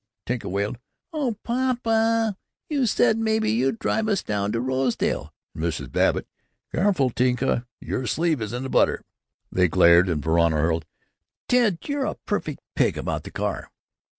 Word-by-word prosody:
Tinka 120 -1 -3
wailed, 100 +5 -2 0.3
"Oh, 265 -9 -1
papa, 230 -3 +1 0.4
you 275 -5 +2
said 220 +1 +3
maybe 220 - +1
you'd 130 - +1
drive 220 -1 0
us 200 -3 +1
down 105 -1 -1
to 115 - -1
Rosedale!" 130 0 -1 0.2
and 80 - -5
Mrs. 85 -2 -3
Babbitt, - - +2 0.5
"Careful, 175 -9 +2
Tinka, 125 0 +1
your 125 - -3
sleeve 160 -5 +1
is 105 -1 -3
in 125 +2 -4
the 135 - -4
butter." - - +2 0.5
They 90 -1 +3
glared, 85 +1 +5
and 75 -4 -1
Verona 85 0 +3
hurled, 80 +1 0 0.6
"Ted, 235 -8 +3
you're 285 -2 -1
a - - -2
perfect - - -4
pig - - +1
about - - -3
the - - -6
car!" - - -3
130 Hz, 155 wpm, -24 LUFS, -, 0.6 s, glared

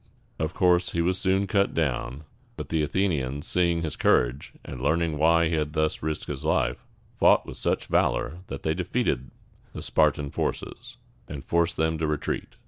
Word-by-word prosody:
Of 80 +1 -2
course, 90 0 +3
he 85 - +1
was 90 +2 0
soon 95 +1 +2
cut 100 0 +1
down; 70 -2 -1 0.3
but - - -6
the 80 -1 +1
Athenians, 75 -5 -1
seeing 85 -2 +1
his 80 - -3
courage, 65 +3 +1
and 65 - -7
learning 80 +3 +1
why 85 +1 +4
he 80 - -2
had 75 -2 -1
thus 80 -1 0
risked 80 0 -3
his - - -6
life, 65 -2 0 0.4
fought - - +5
with - - -9
such - - -1
valor 85 - 0
that 70 - -7
they 80 - +1
defeated 90 - -1 0.4
the - - -6
Spar´tan 70 -1 +1
forces, - - -4 0.3
and 70 -2 -7
forced 85 0 +1
them 80 0 0
to 80 - 0
retreat. 75 -1 -3
80 Hz, 175 wpm, -26 LUFS, 75-85 Hz, 0.4 s, fought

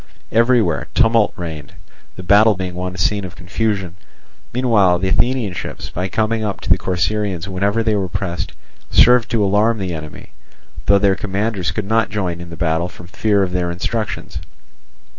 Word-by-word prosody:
Everywhere 115 - +2
tumult 115 -2 +4
reigned, 80 -5 -7 0.4
the 90 - -8
battle 105 +3 +5
being 90 -1 -4
one 90 +1 -4
scene 100 +3 +1
of 90 -1 -8
confusion; 95 -1 -2 0.6
meanwhile 110 -8 +3
the 95 +2 -1
Athenian 120 -2 +1
ships, - - -6
by 90 +2 -2
coming 110 +4 0
up 105 -2 -3
to - - -3
the - - +6
Corcyraeans 95 0 -1
whenever 100 +4 0
they 110 -1 +1
were 95 -3 -1
pressed, 90 -2 -3 0.4
served 125 -1 +5
to 115 -3 +1
alarm 105 +4 +2
the 95 -4 -3
enemy, 75 -1 -8 0.6
though 100 +2 +6
their 100 -1 +3
commanders 100 -1 -2
could 95 +5 -3
not 110 +2 +1
join 90 -5 -3
in 85 - -9
the 85 - -8
battle 80 +1 0
from 90 +1 -13
fear 100 +3 +1
of 90 - -2
their 90 -1 -1
instructions. 105 +5 -3
95 Hz, 170 wpm, -19 LUFS, 90-110 Hz, 0.6 s, the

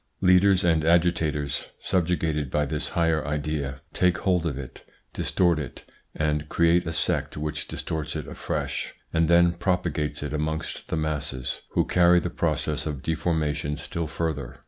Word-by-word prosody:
Leaders 90 +1 +5
and 80 -3 +3
agitators, 80 -4 +1
subjugated 80 -5 0
by 75 +3 +1
this 75 +2 -3
higher 80 -3 +2
idea, 75 -2 -3
take 90 0 +3
hold 90 -4 +1
of 70 -5 -3
it, 70 -2 -8 0.3
distort 85 -3 +2
it 70 -5 -7 0.3
and 75 -1 -1
create 85 0 +3
a - - -1
sect 80 - 0
which 75 -1 -3
distorts 80 -2 -4
it - - -4
afresh, - - -3 0.2
and 80 0 +3
then 85 +1 +5
propagates 85 -5 -1
it 75 0 -4
amongst 80 +1 -3
the - - -2
masses, 70 -5 -2
who - - +2
carry 90 0 +5
the 90 0 -3
process 75 -1 -1
of 70 -4 -4
deformation 75 -3 -1
still 85 +2 -4
further. 70 -5 -3
80 Hz, 150 wpm, -26 LUFS, 75-85 Hz, 0.3 s, Leaders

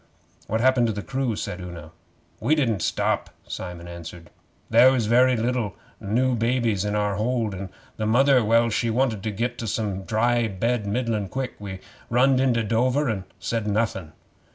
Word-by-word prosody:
'What 110 +1 0
happened 130 -1 +4
to 110 - -1
the 105 0 -5
crew?' 130 -4 -1
said 90 -2 -5
Una. 85 -3 -9 0.5
'We 155 - +2
didn't 115 - 0
stop,' - - 0 0.2
Simon 90 -2 -6
answered. 85 0 -10 0.4
'There 120 +3 +7
was 120 -4 +1
a - - -3
very 125 +1 +5
liddle 115 -4 -1 0.2
new 125 +6 +1
baby 115 -1 +1
in 105 0 -1
our 105 -2 0
hold, 115 -1 0
and 95 0 -6 0.3
the 110 - -1
mother 120 -2 +4
she 115 +2 0
wanted 115 -3 +1
to 110 - -2
get 115 +4 -3
to 115 - -4
some 100 -2 -2
dry 120 +2 +2
bed 110 +2 -1
middlin' 110 -2 -1
quick. 130 -2 -3
We 95 -2 -7 0.3
runned 130 +2 +4
into 125 -3 +2
Dover, 125 +6 +1
and 95 -4 -3
said 105 +5 -2
nothing. 100 -6 -1
115 Hz, 175 wpm, -24 LUFS, 100-125 Hz, 0.5 s, There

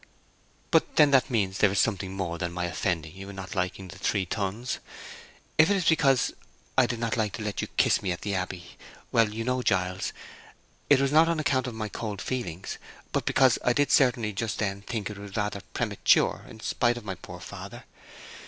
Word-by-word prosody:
"But—then 150 -1 +4
that 135 -2 +4
means 100 -6 0
that - - -4
there 105 - +5
is 100 - -2
something 100 -3 +1
more 90 -3 -3
than 85 -1 -2
my 90 0 -2
offending 85 -2 -2
you 95 +1 -8
in 100 - -9
not 95 -1 -7
liking 90 0 -2
The - - -11
Three 100 -3 0
Tuns. 105 +6 -3 0.8
If 155 +3 +7
it 200 - +4
is 185 - -1
because 140 -6 +3 0.4
I—did 125 -2 +3
not 115 0 -1
like 105 -3 0
to 110 - -5
let 105 -1 -2
you - - -3
kiss - - +4
me 95 - -2
in 85 - -2
the 100 - -3
Abbey—well, 95 +4 -2
you 115 +2 -4
know, 125 +1 0
Giles, 95 -4 0 0.8
that 145 - +7
it - - +1
was 135 - +1
not 160 +2 +6
on 165 -2 0
account 135 -4 +1
of 120 - -5
my 110 -1 -3
cold 105 -1 -5
feelings, 95 -8 -4 0.3
but - - -1
because 130 -2 +4
I 125 - +3
did 145 +3 +2
certainly, 120 -5 +3
just 110 +2 -2
then, 100 -2 -2
think 105 0 -4
it 100 - -9
was 100 0 -8
rather 105 -1 -1
premature, - - +2
in 110 - -12
spite 120 +1 +1
of 120 - -9
my 95 - -3
poor - - -10
father. - - -9
105 Hz, 210 wpm, -27 LUFS, 95-125 Hz, 0.8 s, If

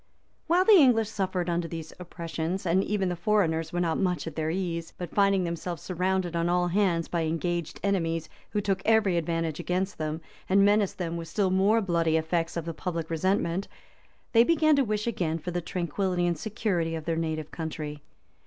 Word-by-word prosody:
While 355 +3 +4
the 415 -3 +8
English 230 -7 +4
suffered 190 -4 -2
under 170 -1 0
these 165 -1 -7
oppressions, 170 +1 -4
even 190 +3 +1
the 175 - -2
foreigners 170 -4 +1
were 175 - -2
not 165 -2 0
much 180 -5 0
at 165 -3 -6
their 155 -1 -1
ease; 170 -2 -3
but 175 -2 -6
finding 200 -2 +3
themselves 170 0 -4
surrounded 185 -1 -1
on 170 0 +1
all 175 0 +2
hands 175 -3 +1
by 170 -2 -1
engaged 170 +1 -2
enemies, 165 -5 0 0.2
who 210 - -1
took 195 -1 -1
every 220 -4 +3
advantage 165 -2 -1
against 185 +2 -2
them, 155 0 -2 0.3
and 195 +1 +5
menaced 205 -1 +2
them 170 -2 -3
with 165 -1 -6
still 195 0 0
more 200 +4 +3
bloody 170 -4 +1
effects 165 +1 -1
of 165 - -3
the 165 - -4
public 165 -1 -4
resentment, 185 +2 0 0.6
they 230 -1 +6
began 310 +1 +4
to 280 - +3
wish 215 -2 -1
again 175 -9 -1
for 165 +2 -5
the 175 0 -2
tranquillity 180 +1 -1
and 170 -3 0
security 185 -6 -1
of 160 -1 -6
their 165 - 0
native 160 -2 -3
country. 155 -2 -5
175 Hz, 190 wpm, -27 LUFS, 165-195 Hz, 0.6 s, the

